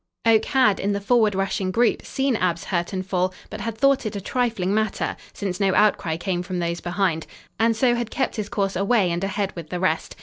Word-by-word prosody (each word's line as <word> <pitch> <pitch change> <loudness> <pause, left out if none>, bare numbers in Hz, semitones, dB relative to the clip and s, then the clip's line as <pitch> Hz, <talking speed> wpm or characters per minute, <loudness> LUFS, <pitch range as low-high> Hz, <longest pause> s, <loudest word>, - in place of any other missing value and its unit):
Oak 225 -1 +5
had, 220 -7 +3
in 200 +1 0
the 200 - -1
forward 215 -1 +3
rushing 195 0 -1
group, 230 +5 +2
seen 270 -2 0
Ab's 175 -4 0
hurt 175 -2 -2
and 185 -1 -3
fall, 185 -1 0 0.2
but 215 - -6
had 225 +1 -4
thought 275 +2 +3
it 215 -3 -4
a - - -2
trifling 210 -3 -1
matter, 215 -1 0 0.2
since 185 -3 -4
no 195 -2 +2
outcry 170 -6 +2
came 175 0 -2
from 180 0 -4
those 170 0 -2
behind, 175 -2 -1 0.3
and 225 0 +3
so 245 +1 +3
had 240 -1 -2
kept 270 - -1
his 205 -1 -3
course 195 -5 -1
away 200 -1 +2
and 170 +2 -2
ahead 195 0 -2
with 165 -3 -8
the 180 - -3
rest. 175 -3 -1
200 Hz, 225 wpm, -23 LUFS, 180-225 Hz, 0.3 s, Oak